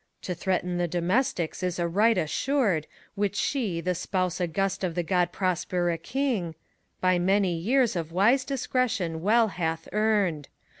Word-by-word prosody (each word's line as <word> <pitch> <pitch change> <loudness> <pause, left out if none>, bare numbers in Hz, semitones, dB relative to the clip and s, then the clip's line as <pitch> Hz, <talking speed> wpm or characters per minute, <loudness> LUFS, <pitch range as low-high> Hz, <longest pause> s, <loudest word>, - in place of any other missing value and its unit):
To 180 - -2
threaten 180 0 -1
the 175 - +1
domestics 180 +2 0
is 180 -1 -1
a 175 -1 0
right 210 +5 +3
assured, 185 - 0 0.3
Which 205 0 -1
she, 210 -13 -1
the 180 +1 0
spouse 185 0 -2
august 195 +3 -1
of 175 -3 -1
the 175 - 0
Grod 180 0 +1
prospere 175 -2 -1
king, 225 - -1 0.5
By 185 -1 +3
many 190 0 +2
years 235 +7 +2
of 165 -2 -3
wise 225 +9 +3
discretion 250 - -1
well 220 +4 +4
hath 165 -3 -3
earned. 205 -9 +1
185 Hz, 150 wpm, -27 LUFS, 170-215 Hz, 0.5 s, well